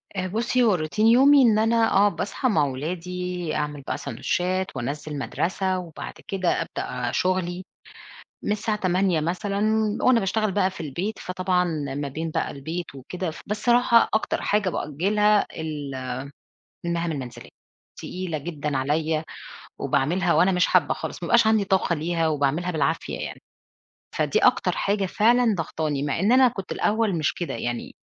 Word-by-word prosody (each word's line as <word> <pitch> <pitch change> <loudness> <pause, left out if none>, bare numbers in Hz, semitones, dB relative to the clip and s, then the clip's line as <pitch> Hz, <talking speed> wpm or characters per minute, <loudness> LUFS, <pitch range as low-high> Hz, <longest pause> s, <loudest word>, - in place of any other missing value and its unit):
آآ، 185 -1 -1
بُصّي، 235 +5 +1
هو 215 -4 +4
روتين 175 +7 0
يومي 275 +4 +7
إن 220 -4 +5
أنا 225 +1 +3
آه، 205 +1 +5
باصحى 205 +7 -2
مع 155 -8 +3
ولادي، 175 +4 -4
أعمل 150 -1 -3
بقى - - -4
ساندوتشات 180 +9 -2
وأنزِّل 145 +4 -4
مدرسة 185 - -1
وبعد 170 -4 -8
كده 185 -3 0
أبدأ 125 -6 -4
أ - - -3
شُغلي 185 0 -1 0.8
من - - +1
الساعة 210 0 -1
08:00 185 -2 +2
مثلًا 190 +5 -2 0.4
وأنا 255 -2 +4
باشتغل 210 +2 0
بقى 190 -1 +2
في - - -11
البيت، 170 +8 -4
فطبعًا 185 0 0 0.3
ما 145 0 -3
بين 160 +4 -4
بقى - - -1
البيت 160 +4 -6
وكده 170 +7 -5
ف 160 - -11
بس 210 +1 -2
الصراحة 240 +1 +4
أكتر 215 - 0
حاجة 205 -2 +1
بأجّلها 205 +9 +1
ال 150 -3 -5 0.9
المَهام 170 0 -1
المنزلية، 130 -5 -7 0.5
تقيلة 180 -4 -4
جدًا 150 -2 -3
عليّا 155 +3 0 0.6
وباعملها 175 +5 +1
وأنا 190 +2 +4
مش 180 0 +3
حابّة - - +3
خالص، - - -6
ما - - -2
بيبقاش 235 -2 +4
عندي 220 -2 +3
طاقة 190 -2 +1
ليها 165 +1 0
وباعملها 150 +4 0
بالعافية 145 -5 -1
يعني، - - -6 0.8
فدي - - +2
أكتر - - +3
حاجة 200 0 0
فعلًا 230 +3 +3
ضاغطاني، 155 -4 -2
مع 145 +2 -1
إن 200 +5 +2
أنا 260 +1 +7
كنت 195 -5 -5
الأول 215 -3 +1
مش 155 -2 0
كده، 175 - -4
يعني 120 +1 -4
180 Hz, 160 wpm, -24 LUFS, 155-205 Hz, 0.9 s, يومي